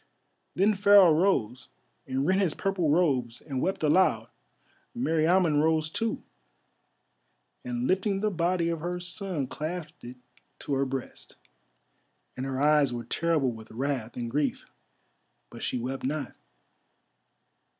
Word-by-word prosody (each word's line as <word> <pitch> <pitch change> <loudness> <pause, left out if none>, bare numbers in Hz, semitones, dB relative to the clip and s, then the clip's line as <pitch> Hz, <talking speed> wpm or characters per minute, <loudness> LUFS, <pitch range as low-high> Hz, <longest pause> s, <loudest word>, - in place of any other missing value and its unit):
Then 205 +3 +3
Pharaoh 200 -3 +6
rose 135 - +1 0.4
and 135 +1 -1
rent 190 +4 +2
his 175 -6 0
purple 195 -5 -1
robes 135 -8 +1
and 135 -4 -4
wept 190 -3 -1
aloud. 180 +5 +3 0.7
Meriamun 165 -5 +2
rose 160 0 +1
too, 225 +4 -2 1.4
and 120 0 -3
lifting 195 +4 +1
the 210 +1 0
body 170 -1 0
of 165 -1 -2
her 175 +2 -3
son 180 -4 -4
clasped 160 +4 -6
it 125 +1 -9 0.4
to 145 - -3
her 135 0 +1
breast, 135 -1 -7 1.0
and 130 +1 -4
her 135 -1 -3
eyes 150 -1 +4
were 120 -1 -5
terrible 155 0 0
with 110 -1 -11
wrath 125 -2 -3
and 120 -1 -4
grief, 145 +2 -1 0.9
but - - -10
she - - -2
wept 130 +3 -4
not. 140 0 -3
155 Hz, 130 wpm, -27 LUFS, 130-180 Hz, 1.4 s, Pharaoh